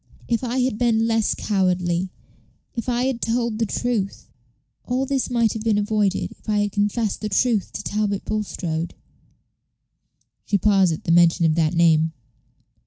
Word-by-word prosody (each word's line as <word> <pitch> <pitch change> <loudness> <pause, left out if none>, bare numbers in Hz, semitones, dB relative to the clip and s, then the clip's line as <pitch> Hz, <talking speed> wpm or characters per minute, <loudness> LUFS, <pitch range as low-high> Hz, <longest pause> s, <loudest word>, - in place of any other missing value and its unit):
"If 235 +1 0
I 245 +1 -2
had 250 -4 -1
been 225 -2 +2
less 225 -1 +1
cowardly 180 -2 0 0.6
if 235 0 -4
I 245 0 +1
had 260 -3 -1
told 230 -1 -1
the 225 - +1
truth 215 -3 -2 0.5
all 255 +2 -1
this 270 -1 -1
might 235 -3 +2
have 220 - -5
been 220 -2 +1
avoided 205 -2 0
if - - -11
I 210 - +2
had 205 0 -1
confessed 210 +1 -1
the 215 - -2
truth 215 0 +1
to - - -5
Talbot 205 -1 -1
Bulstrode." 175 -6 -3 1.5
She 205 - +1
paused 195 -3 +3
at 160 - -4
the - - 0
mention 170 0 +5
of 160 - +3
that 160 +1 +1
name. 160 -1 +3
210 Hz, 165 wpm, -22 LUFS, 185-230 Hz, 1.5 s, mention